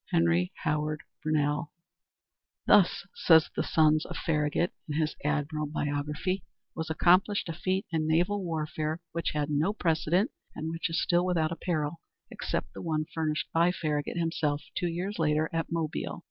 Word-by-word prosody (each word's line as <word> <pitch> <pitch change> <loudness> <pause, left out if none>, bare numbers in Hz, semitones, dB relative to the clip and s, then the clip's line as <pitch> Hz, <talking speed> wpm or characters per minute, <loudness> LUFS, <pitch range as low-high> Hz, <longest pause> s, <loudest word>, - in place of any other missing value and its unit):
Henry 85 +2 +2
Howard 150 0 -1 0.2
Brownell 150 -1 0 0.9
"Thus," - - +5
says 160 - +5
the - - +1
son 155 -1 +4
of - - -6
Farragut, 155 +2 0 0.2
in 150 - -2
his 155 -1 0
admirable 150 +1 -1
biography, 150 +6 -1 0.3
"was 160 0 -4
accomplished 180 +6 +3
a 165 - -3
feat 185 +3 -1
in 160 -2 0
naval 180 +5 +2
warfare 155 -1 -2
which 170 0 -2
had 150 0 0
no 155 +8 +2
precedent, 175 - +1 0.2
and 160 +1 -3
which 165 +1 -2
is 165 - 0
still 175 0 +2
without 170 -4 +1
a - - -2
parallel 160 -2 -2 0.3
except - - -3
the - - -7
one 155 -2 -1
furnished 155 -2 -1
by 170 +2 +4
Farragut 150 -2 -2
himself, 155 -3 0
two 175 - 0
years 175 +4 -3
later, 155 0 +2
at 165 0 -2
Mobile. 165 -2 -2
160 Hz, 160 wpm, -29 LUFS, 150-170 Hz, 0.9 s, Thus